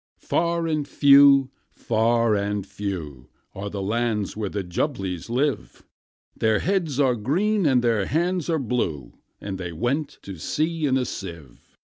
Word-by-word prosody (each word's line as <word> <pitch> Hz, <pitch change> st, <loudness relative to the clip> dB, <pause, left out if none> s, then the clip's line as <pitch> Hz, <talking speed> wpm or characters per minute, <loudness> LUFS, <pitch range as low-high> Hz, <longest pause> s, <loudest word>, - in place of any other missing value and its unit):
Far 170 Hz, 0 st, 0 dB
and 155 Hz, -3 st, -1 dB
few, 140 Hz, -2 st, +6 dB, 0.2 s
far 115 Hz, 0 st, +1 dB
and 100 Hz, -1 st, -1 dB
few, 80 Hz, -11 st, -6 dB, 0.2 s
Are 100 Hz, +1 st, -5 dB
the 100 Hz, -1 st, -4 dB
lands 110 Hz, -1 st, -1 dB
where 105 Hz, -2 st, -3 dB
the 100 Hz, 0 st, -3 dB
Jumblies 95 Hz, -, -3 dB
live: 125 Hz, -, -2 dB, 0.5 s
Their 110 Hz, -1 st, +2 dB
heads 170 Hz, -, -1 dB
are 135 Hz, -3 st, +4 dB
green, 175 Hz, -, +1 dB
and 130 Hz, -3 st, +3 dB
their 115 Hz, -5 st, +1 dB
hands 175 Hz, +2 st, 0 dB
are 165 Hz, -, +2 dB
blue 105 Hz, -, -2 dB, 0.3 s
And 95 Hz, -2 st, -6 dB
they 90 Hz, -2 st, -5 dB
went 135 Hz, -, -2 dB
to 95 Hz, -4 st, -8 dB
sea 160 Hz, -, -1 dB
in 130 Hz, -1 st, +2 dB
a 130 Hz, -, 0 dB
sieve. 85 Hz, -, -9 dB
120 Hz, 150 wpm, -24 LUFS, 100-145 Hz, 0.5 s, few